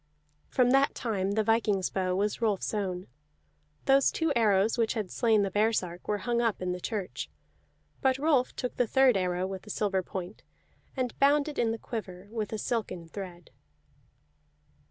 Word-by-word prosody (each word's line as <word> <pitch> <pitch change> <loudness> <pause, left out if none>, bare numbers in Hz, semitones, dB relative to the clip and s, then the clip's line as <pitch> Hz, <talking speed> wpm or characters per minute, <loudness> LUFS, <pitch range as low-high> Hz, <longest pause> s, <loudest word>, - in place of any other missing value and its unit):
From 250 -1 +3
that 275 +1 +3
time 200 -4 -1
the 220 +1 +2
viking's 210 -4 +1
bow 185 -1 0
was 205 +4 -1
Rolf's 215 -3 0
own. 185 -3 -2 0.8
Those 270 0 +5
two 325 -3 0
arrows 215 -2 +3
which 230 -1 +1
had 210 -5 -3
slain 220 -4 +3
the 195 - -1
baresark 205 -4 0
were 210 - +1
hung 235 +3 0
up 230 -3 0
in 185 -1 -2
the 180 - -3
church; 200 0 -4 0.7
but 265 -2 +3
Rolf 280 -3 +2
took 250 - -4
the 245 - +2
third 265 0 +5
arrow 180 -1 0
with 190 0 -5
the 210 - -14
silver 195 -2 0
point, 185 +2 -7 0.6
and 250 -2 -2
bound 285 +2 +4
it 300 - -4
in 230 - +2
the 225 - -1
quiver 200 -5 -7
with 220 -2 -3
a 220 - -2
silken 190 -7 -3
thread. 175 -3 -8
215 Hz, 175 wpm, -29 LUFS, 190-240 Hz, 0.8 s, Those